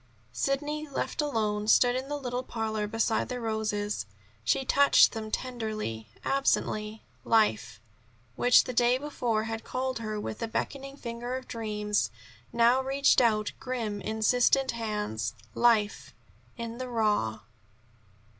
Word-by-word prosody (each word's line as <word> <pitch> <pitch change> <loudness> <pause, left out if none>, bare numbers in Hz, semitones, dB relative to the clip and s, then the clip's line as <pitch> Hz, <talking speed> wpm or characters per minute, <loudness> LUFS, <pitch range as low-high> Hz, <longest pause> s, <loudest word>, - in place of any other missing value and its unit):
Sidney, 295 +3 -1
left 280 - -2
alone, 215 -7 -1
stood 245 +2 +5
in 260 +2 -3
the 290 - -2
little 250 -2 -3
parlor 220 -4 -3
beside 225 +1 0
the 250 -1 -3
roses. 215 - -2 0.4
She 265 - +1
touched 280 +2 +6
them 220 -2 -5
tenderly, 215 - -4 0.2
absently. 215 -5 0 0.2
Life, 215 - +2 0.6
which 245 0 +6
the 255 - -5
day 245 +1 +4
before 245 -6 -1
had 225 0 -4
called 260 -1 -3
her 215 -2 -3
with 210 - -5
the 230 - -2
beckoning 275 +4 -4
finger 240 0 -5
of 260 - -9
dreams, 210 - -1 0.4
now 235 +2 +4
reached 270 0 +3
out 215 -3 +2
grim 230 -6 -3
insistent 245 +5 +2
hands. 210 - -3 0.2
Life 220 -3 +2 0.4
in 235 0 -6
the 255 -1 -4
raw. 210 - 0
230 Hz, 130 wpm, -28 LUFS, 215-255 Hz, 0.6 s, touched